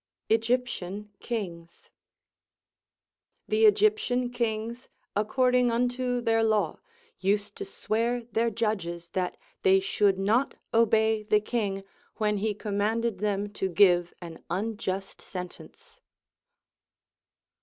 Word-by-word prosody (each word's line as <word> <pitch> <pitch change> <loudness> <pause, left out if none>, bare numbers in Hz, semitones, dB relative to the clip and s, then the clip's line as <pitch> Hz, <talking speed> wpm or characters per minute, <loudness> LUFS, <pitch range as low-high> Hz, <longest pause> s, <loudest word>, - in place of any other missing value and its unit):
Egyptian 220 -4 0
Kings. 175 -8 -6 1.6
The 440 +1 +3
Egyptian 410 - +2
kings, 235 +1 -3 0.3
according 250 +4 +3
unto 245 +1 0
their 225 -1 +2
law, 215 -2 +1 0.4
used 200 +2 0
to 405 - -5
swear 235 - -1
their 230 +2 +2
judges 190 -6 -2
that 180 -1 -2 0.2
they 190 0 +5
should 195 0 +2
not 220 +8 +1 0.2
obey 220 -1 +3
the 210 0 +3
king 205 -3 -2 0.3
when 210 -1 +1
he 210 +1 -1
commanded 210 +1 -1
them 205 0 -1
to 190 - -2
give 175 -1 +4
an 165 -2 -9
unjust 195 0 -3
sentence. 180 -1 -9
215 Hz, 100 wpm, -28 LUFS, 195-235 Hz, 1.6 s, they